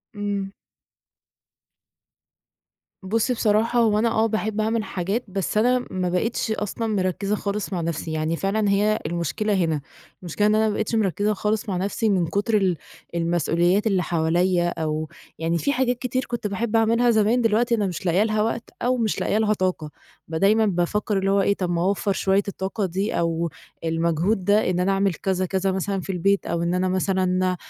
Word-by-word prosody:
امم. 200 -1 -3 2.5
بُصِّي، 225 +6 +1
بصراحة 225 +1 +2
هو 215 -3 +3
أنا 230 +2 +2
آه 225 0 +2
باحب 220 0 -1
أعمل 220 +1 0
حاجات، 200 +5 -2
بس 195 +1 -2
أنا 245 +3 +2
ما 185 -1 -1
بقيتِش 220 +5 -1
أصلًا 220 +1 -2
مركزة 200 0 -1
خالص 200 -1 -3
مع 175 - -1
نفسي، 165 0 -3
يعني 155 +1 -1
فعلًا 200 +4 0
هي 210 +2 +2
المشكلة 170 +6 -1
هنا، 165 -6 +1 0.4
المشكلة 185 +4 0
إن 210 - +3
أنا 220 0 +3
ما 215 - 0
بقيتِش 220 +2 -1
مركزة 205 0 +1
خالص 210 +2 -1
مع 185 - -1
نفسي 200 +4 -1
من 185 -4 +2
كتر 205 +5 +1
ال 185 -4 +1 0.4
المسئوليات 175 +4 +1
اللي 190 -3 +1
حواليا، 175 +2 +1
أو 155 -2 -3 0.3
يعني 165 +1 0
في 280 - 0
حاجات 250 -2 +1
كتير 255 +1 -2
كُنت 235 -3 -3
باحب 215 +3 -2
أعملها 230 +2 +3
زمان، 220 +2 +3
دلوقتي 235 +1 +2
أنا 205 -3 0
مش 185 +2 -5
لاقية 180 +4 +3
لها 215 -1 0
وقت 230 +1 -2
أو 250 +1 +1
مش 225 -3 0
لاقية 210 - +1
لها 215 -1 +2
طاقة، 185 -6 -2 0.4
بدايمًا 200 +7 +3
بافكر 200 +2 0
اللي 195 0 +1
هو 200 - +3
إيه 200 - +2
طَب 180 -3 -2
ما 170 -1 0
أوفّر 200 +2 +1
شوية 195 +1 +1
الطاقة 195 +1 -3
دي 190 +4 -2
أو 170 0 0 0.3
المجهود 170 +4 0
ده 205 0 +3
إن 180 -1 0
أنا 185 +2 +2
أعمل 195 -1 +1
كذا، 185 +2 -1
كذا 190 +1 0
مثلًا 190 +1 -2
في 195 - -4
البيت 195 +2 +1
أو 170 0 -1
إن 170 +1 0
أنا 185 +1 +1
مثلًا 185 -1 +1
195 Hz, 180 wpm, -23 LUFS, 180-215 Hz, 2.5 s, هو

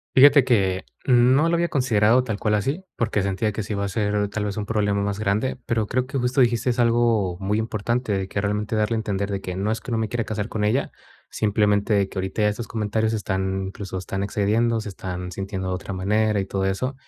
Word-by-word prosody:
Fíjate 140 0 +8
que, 95 -7 +1 0.2
no 130 +5 +5
lo 170 - +2
había 170 0 +1
considerado 120 -2 +3
tal 110 -5 -3
cual 105 - 0
así, 135 - -1
porque 110 -3 0
sentía 100 +3 0
que 105 +1 -4
sí 105 - -5
va 100 0 -1
a - - -3
ser, 105 0 0
tal 105 +1 -3
vez, 105 0 -3
un 105 - -3
problema 105 -2 0
más 100 0 -2
grande, 110 +4 0
pero 110 -2 0
creo 130 +3 -1
que 135 +1 -3
justo 125 +2 +2
dijiste 120 +1 +2
algo 115 -6 +2
muy 100 +2 0
importante, 110 +1 -1
de 95 -1 -1
que 100 - -4
realmente 105 +2 -1
darle 110 +1 +1
a - - 0
entender 100 -2 -2
de 100 -1 -2
que 90 -1 -5
no 100 +3 -1
es 110 - -3
que - - -9
no 115 - 0
me 110 -1 -1
quiera 120 -2 -1
casar 110 0 -4
con 105 -1 -1
ella, 120 +7 0 0.4
simplemente 105 -1 +1
que - - -6
ahorita 95 +3 -2
ya 105 - +4
estos 110 +3 -6
comentarios 110 0 -1
están 95 -2 -2
incluso 95 -1 -7
están 95 +1 -3
excediendo, 110 +3 +1
se 105 - -6
están 90 -1 -6
sintiendo 95 0 -4
de 95 - -1
otra 95 +1 -5
manera 105 +3 +1
y - - -1
todo 95 0 -2
eso. 130 +8 -1
105 Hz, 230 wpm, -23 LUFS, 100-115 Hz, 0.4 s, Fíjate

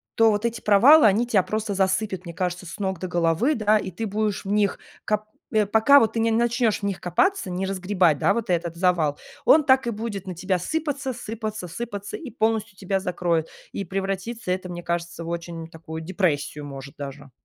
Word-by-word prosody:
то 225 0 +5
вот 210 +1 0
эти 230 0 -2
провалы, 235 +7 +7
они 210 +4 +3
тя 215 -6 +3
просто 215 +1 -3
засыпят, 190 0 0
мне 170 - -7
кажется, 180 0 -3
с 170 - -8
ног 190 -4 -2
до 185 - -4
головы, 175 - +1
да, 215 -1 +3
и 190 - -5
ты 190 +5 -5
будешь 210 0 -2
в 195 - -3
них, 205 -2 +2 0.3
кап 210 0 0 0.3
э, 215 -1 +3
пока 220 +7 +6
вот 225 - +1
ты 225 - -1
не 230 - +2
начнешь 235 -1 +1
в - - -18
них 200 -2 -2
копаться, 375 - +1
не 180 +2 -2
разгребать, 185 -5 +1
да, - - +3
вот 230 -4 -2
этот 170 -1 -1
завал, 170 -5 +1 0.3
он 305 +1 +6
так 265 -2 +4
и - - +2
будет 210 -3 -5
на 185 - -5
тебя 185 +2 -1
сыпаться 280 - -2
сыпаться 215 -4 -5
сыпаться 205 - -6
и 325 -9 -8
полностью 220 -2 -1
тебя 195 0 -1
закроет. 175 -3 -1 0.2
И 200 - -4
превратится 195 +2 -3
это, 185 0 -2
мне 175 0 -6
кажется, 170 0 -3
в 165 - -6
очень 170 -1 -5
такую 160 0 -8
депрессию, 160 -5 -1
может 140 -1 -8
даже. 140 -1 -8
195 Hz, 205 wpm, -24 LUFS, 175-225 Hz, 0.3 s, провалы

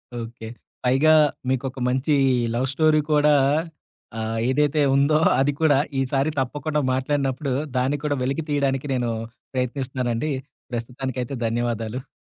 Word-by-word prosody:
Okay. 115 -1 -7 0.4
పైగా 135 +5 +4 0.4
మీకొక 130 0 -2
మంచి 130 +4 +1 0.4
లవ్ 130 +2 0
స్టోరీ 155 +1 +3
కూడా 150 0 +4 0.9
ఆహ్, 110 0 -2
ఏదైతే 150 +2 +2
ఉందో, 140 +2 +4 0.2
అది 140 +2 +2
కూడా 150 -4 +5 0.2
ఈసారి 135 +2 +1
తప్పకుండా 145 +3 -1
మాట్లాడినప్పుడు, 135 0 -1 0.2
దాన్ని 130 +3 +1
కూడా 145 -1 0
వెలికి 135 +5 -1
తీయడానికి 140 -1 0
నేను 125 -2 0 0.5
ప్రయత్నిస్తానండి. 130 +1 -2 0.4
ప్రస్తుతానికి 125 +2 -4
అయితే 130 +3 -5
ధన్యవాదాలు. 120 +2 -2
135 Hz, 120 wpm, -23 LUFS, 125-145 Hz, 0.9 s, కూడా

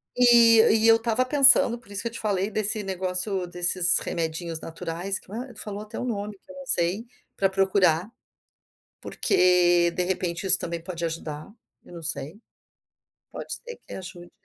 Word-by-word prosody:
e 235 -2 +6 0.2
e 225 - +3
eu 225 0 +6
estava 230 +2 -1
pensando, 270 -3 +7
por 235 - -19
isso 200 -1 -3
que - - -4
eu - - -18
te 235 - -8
falei, 200 -2 -1
desse 215 0 -2
negócio 185 0 -2
desses 175 0 +2
remedinhos 165 0 -4
naturais, 165 +4 -5
que, - - -19
ah, 245 +4 -7
tu - - -10
falou 205 -1 -7
até 215 0 -10
o - - -4
nome, 210 -3 -5
que 280 - -18
eu - - -13
não 275 0 -10
sei, 180 +1 0 0.3
para 195 - +1
procurar, 190 -1 +1 0.9
porque, 175 -1 +2
de 180 - -2
repente, 180 0 -3
isso 185 -1 +5
também 170 -1 -4
pode 170 -1 -6
ajudar, 160 0 -6 0.3
eu - - -16
não 170 - -10
sei. 150 +3 -4 0.9
Pode - - -7
ser 485 -1 -9
que - - -10
ajude. 180 -2 -10
190 Hz, 180 wpm, -24 LUFS, 175-220 Hz, 0.9 s, pensando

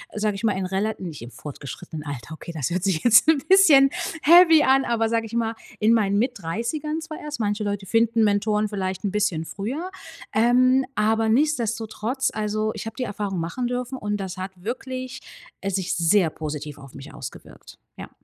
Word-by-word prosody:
sage 210 -1 0
ich 215 +3 -4
mal, 210 - +3
in 190 - -2
rela 195 +4 -1
nicht 165 -9 -7
im 120 +1 -9
fortgeschrittenen 150 +4 -8
Alter. 140 -1 -7
Okay, 170 +1 -9
das 140 -5 -1
hört 180 +1 -1
sich 180 -5 0
jetzt 240 +5 +6
n' 320 -3 +5
bisschen 310 -9 +7 0.3
heavy 330 -1 +7
an, 265 0 +4
aber 225 -1 0
sage 230 0 0
ich 225 - -11
mal, 230 -1 0 0.3
in 220 +2 +5
meinen 200 -3 +2
Mitt-30ern 245 - -2
zwar 315 -1 -8
erst. 300 -5 -6
Manche 210 0 -1
Leute 205 -1 -3
finden 225 +1 +2
Mentoren 210 0 +1
vielleicht 190 -1 -3
'n 200 - -1
bisschen 200 -6 0
früher. 270 - -5 0.4
Ähm, 255 +4 +4
aber 220 +1 +2
nichtsdestotrotz, 235 -2 0
also 215 0 -1
ich - - -7
habe 225 - -6
die 255 - -2
Erfahrung 205 -4 -3
machen 240 +9 -3
dürfen 250 +1 -3
und 210 -2 -2
das 190 -2 -6
hat 185 +1 -5
wirklich, 255 +2 -5 0.4
äh, 195 - -3
sich 190 -2 -1
sehr 170 +1 +3
positiv 150 -2 -6
auf 135 -2 -13
mich 135 0 -10
ausgewirkt. - - -11 0.2
Ja. - - -8
215 Hz, 190 wpm, -24 LUFS, 190-250 Hz, 0.4 s, bisschen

